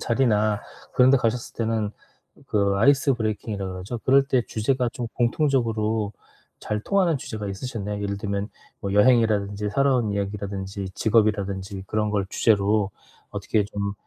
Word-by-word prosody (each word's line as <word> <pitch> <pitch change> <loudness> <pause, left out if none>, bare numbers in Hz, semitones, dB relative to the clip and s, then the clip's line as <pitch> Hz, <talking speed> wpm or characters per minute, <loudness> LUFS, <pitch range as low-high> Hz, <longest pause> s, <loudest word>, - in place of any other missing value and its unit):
자리나 110 -4 +2 0.3
그런 125 0 +5
데 135 - +6
가셨을 120 -1 -1
때는 110 -2 -1 0.6
그 100 -2 +1
아이스 140 +5 +4
브레이킹이라고 105 -4 -3
그러죠. 95 +6 -5
그럴 135 +1 +5
때 130 -3 +2
주제가 125 +3 0
좀 120 -2 -4
공통적으로 115 -5 +1 0.5
잘 105 0 -2
통하는 185 - +2
주제가 110 -5 -6
있으셨나요? 105 -1 -4
예를 100 0 -2
들면 100 0 -2 0.3
뭐 100 -2 -3
여행이라든지 105 -2 +3
살아온 125 -1 +2
이야기라든지 100 -1 -4
직업이라든지 100 -3 0
그런 105 +1 0
걸 100 -2 0
주제로 105 -1 +2 0.4
어떻게 105 -2 0
좀 100 -1 -3
105 Hz, 365 characters per minute, -24 LUFS, 100-120 Hz, 0.6 s, 데